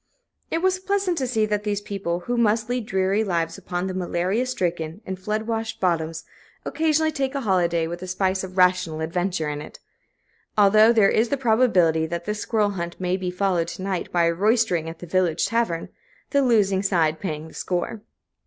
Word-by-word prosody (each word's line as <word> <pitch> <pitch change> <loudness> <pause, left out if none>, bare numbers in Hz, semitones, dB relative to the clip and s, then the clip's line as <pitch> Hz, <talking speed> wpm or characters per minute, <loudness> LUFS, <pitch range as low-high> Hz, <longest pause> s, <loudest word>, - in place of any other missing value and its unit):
It 330 +2 -1
was 375 0 +2
pleasant 385 -1 0
to 260 - -1
see 220 -3 +1
that 210 -1 -1
these 205 -1 -1
people, 195 -4 -3
who 245 +6 -2
must 220 -1 +1
lead 245 -3 -2
dreary 190 +3 +1
lives 170 -2 -1
upon 180 -1 -3
the 190 - -3
malaria 185 +6 -1
stricken 175 -7 -2
and 190 -1 -5
flood 215 +3 -2
washed 225 0 -3
bottoms, 165 -3 -1 0.4
occasionally 315 0 +1
take 275 -2 -2
a 275 - -1
holiday 175 -6 +1
with 175 +2 -6
a 185 - -6
spice 190 +1 0
of 185 0 -8
rational 180 -3 +3
adventure 175 0 -1
in 145 0 -3
it; - - -11 0.8
although 215 +2 +6
there 215 -4 +4
is 225 +2 +2
the 280 - 0
probability 220 -10 +3
that 170 +1 -4
this 210 0 -3
squirrel 210 -2 +1
hunt 170 -3 -5
may 180 0 0
be 185 -1 -3
followed 180 -2 0
to 185 - -7
night 190 -2 -3
by 175 -1 +2
a 170 0 +3
roystering 200 -4 +1
at 165 - -9
the 175 - -9
village 175 -1 +1
tavern, 230 -8 -1 0.4
the 280 - +3
losing 205 -7 +3
side 165 -5 +1
paying 155 -4 -4
the - - -15
score. 185 +4 -3
190 Hz, 195 wpm, -23 LUFS, 170-220 Hz, 0.8 s, although